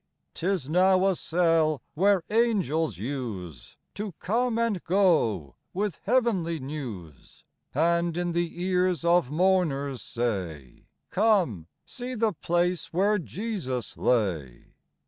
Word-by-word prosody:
'Tis 180 -5 -1
now 185 +3 +4
a 195 -1 +3
cell, 165 -3 +2
where 195 +2 +3
angels 180 - +1
use 105 - -6 0.2
To 205 -2 -5
come 230 +7 0
and 230 -6 0
go 160 - +2 0.2
with 205 -2 -2
heavenly 200 -9 +1
news, 120 - -8 0.3
And 170 +2 +2
in 175 0 -1
the 170 +1 -2
ears 180 -2 +1
of 170 -6 +3
mourners 150 -6 +1
say, 90 - -4
— - - -53
"Come, 180 - +2 0.2
see 250 +1 -6
the 220 -2 +1
place 175 +2 -1
where 205 +4 +2
Jesus 180 - -4
lay." 85 - -1
170 Hz, 115 wpm, -27 LUFS, 130-195 Hz, 0.3 s, now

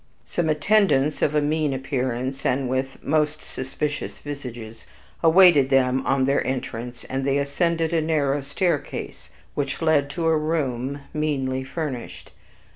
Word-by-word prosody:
Some 170 -2 -1
attendants 155 -3 +2
of 150 - +2
a 150 - +4
mean 150 -2 0
appearance, 130 0 -2
and 130 +1 +1
with 130 +1 -3
most 155 0 0
suspicious 145 +3 -4
visages, 120 -6 -8 0.3
awaited 165 -5 +6
them 130 -1 +3
on 135 -1 +2
their 140 +1 +2
entrance, 125 -2 -4
and 135 0 -3
they 140 +1 +1
ascended 165 +3 0
a 165 - +3
narrow 145 -3 +1
staircase, 145 +3 -3 0.2
which 140 -2 -2
led 155 -3 +2
to 165 +3 -3
a 160 0 +4
room 140 -4 -1
meanly 135 -4 -1
furnished. 135 -3 -6
140 Hz, 135 wpm, -24 LUFS, 130-155 Hz, 0.3 s, awaited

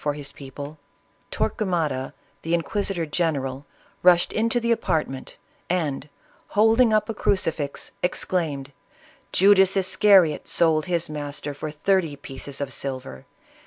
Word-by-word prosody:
121 145 -1 -1
for - - -9
his 145 -2 -4
people, 140 +2 -9 0.5
Torquemada, 165 - -1 0.3
the 165 +1 0
inquisitor 180 0 -1
general, 145 -4 -2 0.3
rush 175 -1 +6
ed - - -9
into 230 +2 +1
the 235 0 0
apartment, 150 -11 -2 0.3
and 150 -5 -1 0.5
holding 225 +2 +5
up 215 -1 +2
a 225 - -3
crucifix, 165 -8 -1
ex 180 - 0
claimed, 145 -7 -2 0.6
"Judas 195 0 +5
Iscariot 190 -4 +4
sold 160 -2 +3
his 170 -1 0
master 145 -1 -5
for 150 +2 -5
thirty 165 0 0
pieces 135 0 -7
of 140 -2 -3
silver. 130 - -6
160 Hz, 130 wpm, -24 LUFS, 145-190 Hz, 0.6 s, rush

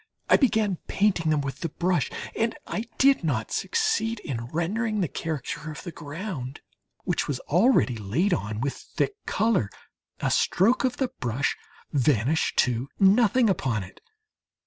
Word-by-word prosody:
I - - +9
began 215 - +2
painting 185 -6 +1
them 150 -2 +2
with 140 -1 -5
the 165 - -2
brush 180 +3 0 0.3
and 225 0 0
I 220 - -3
did 275 -6 +4
not 125 -9 -1
succeed 435 - 0
in 115 - -4
rendering 210 - -1
the 180 - +1
character 155 +1 -4
of 150 - -8
the 175 - -6
ground 150 -4 -6 0.4
which - - -1
was 140 -4 -2
already 175 - +3
laid 145 - +1
on 110 -7 -2
with 140 +1 -1
thick - - -3
colour, 200 - +1 0.5
a - - 0
stroke 225 +10 +3
of 255 -2 0
the 265 -2 0
brush 125 +3 0 0.4
vanished 140 +1 +2
to 125 +2 -2
nothing 220 +4 +5
upon 130 - 0
it. 90 - -14
165 Hz, 150 wpm, -26 LUFS, 135-215 Hz, 0.5 s, I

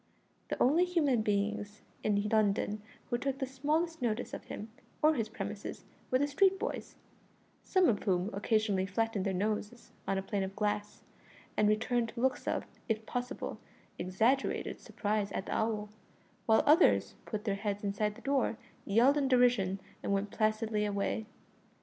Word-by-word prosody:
The - - -3
only 305 +8 +5
human 305 -10 +2
beings 210 0 -1 0.2
in 205 -1 +2
London 210 -1 +1 0.3
who 240 - +1
took 275 0 -1
the 270 - -1
smallest 300 +5 -1
notice 235 -1 -1
of - - -6
him 215 +1 -7 0.3
or 310 +1 +6
his 225 -6 -1
premises - - -6 0.2
were 255 - +4
the 285 - +2
street 385 +6 +3
boys, - - -4 0.7
some 375 -2 +3
of 210 -5 +2
whom 185 +1 +1
occasionally 205 -2 +1
flattened 215 0 0
their - - +1
noses 210 +4 -2 0.2
on 195 - +1
a 190 - -2
pane 200 0 -1
of 190 0 -3
glass, 210 0 -2 0.5
and 210 0 +4
returned 230 +2 +1
looks 255 +1 0
of, - - 0 0.2
if 220 0 0
possible, 245 +3 -4 0.4
exaggerated 225 +9 +1
surprise 205 -1 -2
at 190 - -2
the - - -3
owl, 215 -1 0 0.6
while 220 -1 +5
others 310 +5 +5
put 210 -2 -3
their 205 - +1
heads 200 0 -3
inside 205 +1 -1
the - - -13
door, 270 -5 +1 0.3
yelled 240 +8 +4
in 280 -2 +2
derision, 245 -7 +3 0.2
and - - -2
went 200 +1 0
placidly 215 0 +1
away. 205 +1 -1
220 Hz, 160 wpm, -32 LUFS, 205-255 Hz, 0.7 s, or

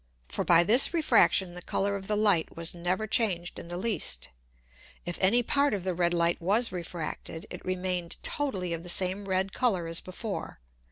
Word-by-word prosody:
For - - -2
by 170 -1 +6
this 240 - +5
Refraction 195 - +3
the 180 - -6
Colour 200 +3 -1
of 195 -1 -7
the 210 - 0
Light 205 -7 +2
was 165 0 +2
never 180 +4 -2
changed 195 -6 -1
in - - -10
the 175 +1 -6
least. 220 +3 -2 0.8
If 175 0 -5
any 225 +6 +4
Part 280 0 +1
of 190 - -5
the 185 -1 -1
red 175 0 +1
Light 170 0 +1
was 210 +7 +1
refracted, 170 -2 -6
it - - -8
remained 180 -2 -2
totally 190 -12 -2
of 165 - -5
the 175 - -8
same 185 +3 +2
red 190 +1 -1
Colour 195 -9 0
as 165 0 -2
before. 195 - -6
185 Hz, 185 wpm, -28 LUFS, 175-210 Hz, 0.8 s, by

